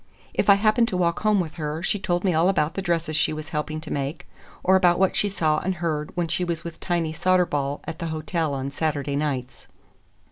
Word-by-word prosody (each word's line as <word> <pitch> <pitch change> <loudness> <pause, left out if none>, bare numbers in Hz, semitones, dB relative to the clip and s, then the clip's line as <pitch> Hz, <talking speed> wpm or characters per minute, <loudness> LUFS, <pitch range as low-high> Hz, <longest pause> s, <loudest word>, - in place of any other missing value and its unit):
If - - +1
I 200 - +9
happened 215 +3 +3
to 185 - -2
walk 170 -2 +1
home 215 -2 +3
with 160 -4 -2
her, 150 +2 -3
she 205 - 0
told 175 -2 -1
me 185 -3 +2
all 165 +3 +3
about 155 -5 +1
the 195 - -3
dresses 170 -3 -1
she 155 - +2
was 155 +1 -6
helping 155 0 -3
to 155 - -5
make, 140 +3 -4 0.4
or 190 - +5
about 180 -2 +4
what 190 0 +2
she 205 - +1
saw 155 -5 +1
and 190 +1 -2
heard 155 -3 -2
when 175 -1 +1
she 175 +2 -1
was 170 -1 -2
with 170 -1 -8
Tiny 170 -3 -1
Soderball 160 -5 +1
at 165 - -6
the 170 - -3
hotel 160 -1 -2
on 135 +1 -3
Saturday 145 -1 -1
nights. 135 -4 -3
165 Hz, 225 wpm, -24 LUFS, 150-180 Hz, 0.4 s, I